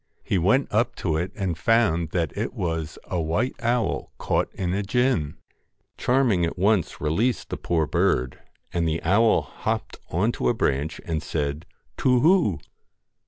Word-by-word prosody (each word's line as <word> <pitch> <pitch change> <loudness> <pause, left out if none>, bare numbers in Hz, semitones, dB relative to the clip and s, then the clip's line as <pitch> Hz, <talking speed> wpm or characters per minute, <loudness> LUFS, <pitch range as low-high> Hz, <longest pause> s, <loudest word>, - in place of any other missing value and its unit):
He 95 - 0
went 105 +11 +3
up 115 +2 +1
to 80 -4 -1
it 85 +4 -1
and 95 -5 -2
found 85 -4 +2
that 85 -3 -2
it - - -3
was 80 -2 -3
a 90 -2 -2
white 85 +11 0
owl 120 0 0
caught - - 0
in 90 -2 -2
a 100 - 0
gin. 105 - 0 0.6
Charming 125 -8 +2
at 85 - -1
once 100 -1 +1
released 105 - 0
the - - -2
poor 80 -2 0
bird, 65 -3 0 0.3
and 85 -1 +1
the 80 +2 -1
owl 100 +7 +4
hopped - - -4
on 100 +8 +1
to - - -1
a 120 - +1
branch, 75 -4 -1
and 80 -2 -2
said, 75 0 -3
' - - -43
To 125 -1 +4
whoo 155 - +3
90 Hz, 165 wpm, -24 LUFS, 80-115 Hz, 0.6 s, owl